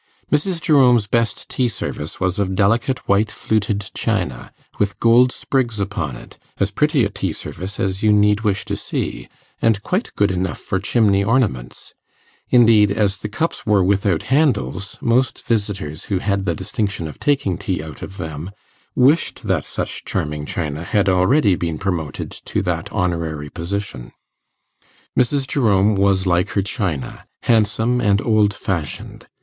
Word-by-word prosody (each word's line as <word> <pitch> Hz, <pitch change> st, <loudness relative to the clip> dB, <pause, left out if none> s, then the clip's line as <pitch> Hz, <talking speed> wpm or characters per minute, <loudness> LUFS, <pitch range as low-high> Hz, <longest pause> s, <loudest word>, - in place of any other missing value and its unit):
Mrs. 165 Hz, +4 st, +1 dB
Jerome's 125 Hz, -8 st, +4 dB
best 115 Hz, +2 st, -1 dB
tea 125 Hz, -, 0 dB
service 75 Hz, -9 st, -5 dB
was 95 Hz, +1 st, -1 dB
of 95 Hz, -1 st, 0 dB
delicate 115 Hz, +6 st, +1 dB
white 100 Hz, +2 st, +3 dB
fluted 105 Hz, -3 st, -1 dB
china, 60 Hz, -1 st, -2 dB, 0.3 s
with 100 Hz, -1 st, 0 dB
gold 120 Hz, +2 st, +5 dB
sprigs 120 Hz, -6 st, -1 dB
upon 90 Hz, -9 st, -2 dB
it -, -, -14 dB, 0.2 s
as 100 Hz, 0 st, +1 dB
pretty 150 Hz, +1 st, +2 dB
a -, -, -1 dB
tea 100 Hz, -3 st, -3 dB
service 95 Hz, +5 st, -7 dB
as 95 Hz, 0 st, -1 dB
you 110 Hz, -, +4 dB
need 105 Hz, 0 st, +4 dB
wish 105 Hz, -3 st, 0 dB
to -, -, -2 dB
see, -, -, -4 dB, 0.3 s
and 110 Hz, -3 st, +2 dB
quite 185 Hz, +6 st, -1 dB
good 100 Hz, -1 st, +2 dB
enough 90 Hz, 0 st, -2 dB
for 95 Hz, -, -2 dB
chimney 100 Hz, -1 st, +2 dB
ornaments; 100 Hz, -, -1 dB, 0.6 s
indeed, 110 Hz, -4 st, +6 dB
as 100 Hz, -1 st, +1 dB
the 105 Hz, -, -6 dB
cups 160 Hz, +10 st, -2 dB
were 105 Hz, -3 st, +4 dB
without 100 Hz, -2 st, +1 dB
handles, 105 Hz, -, 0 dB
most 120 Hz, +2 st, +1 dB
visitors 100 Hz, -9 st, -2 dB
who 100 Hz, -, -1 dB
had 100 Hz, 0 st, -1 dB
the 85 Hz, -3 st, 0 dB
distinction 95 Hz, -1 st, -3 dB
of 75 Hz, -, -10 dB
taking 135 Hz, -11 st, +1 dB
tea 95 Hz, -3 st, -3 dB
out 80 Hz, -1 st, -10 dB
of 95 Hz, -, -8 dB
them, 80 Hz, +2 st, -5 dB, 0.5 s
wished 135 Hz, +1 st, +3 dB
that 95 Hz, -8 st, 0 dB
such -, -, -4 dB
charming 75 Hz, 0 st, -3 dB
china 75 Hz, -3 st, -3 dB
had 100 Hz, +3 st, +1 dB
already 95 Hz, +5 st, +4 dB
been 85 Hz, -3 st, -2 dB
promoted 85 Hz, -7 st, -3 dB
to -, -, -4 dB
that -, -, -2 dB
honorary 80 Hz, -5 st, -2 dB
position. 85 Hz, -8 st, -5 dB, 1.0 s
Mrs. 135 Hz, +2 st, +1 dB
Jerome 105 Hz, -7 st, +3 dB
was 100 Hz, -1 st, +2 dB
like 90 Hz, +2 st, +2 dB
her 100 Hz, -, +3 dB
china, 95 Hz, -, -3 dB, 0.2 s
handsome 115 Hz, +2 st, +2 dB
and 100 Hz, -3 st, +3 dB
old 110 Hz, -3 st, +3 dB
fashioned. 85 Hz, -7 st, -4 dB
100 Hz, 155 wpm, -20 LUFS, 90-115 Hz, 1.0 s, indeed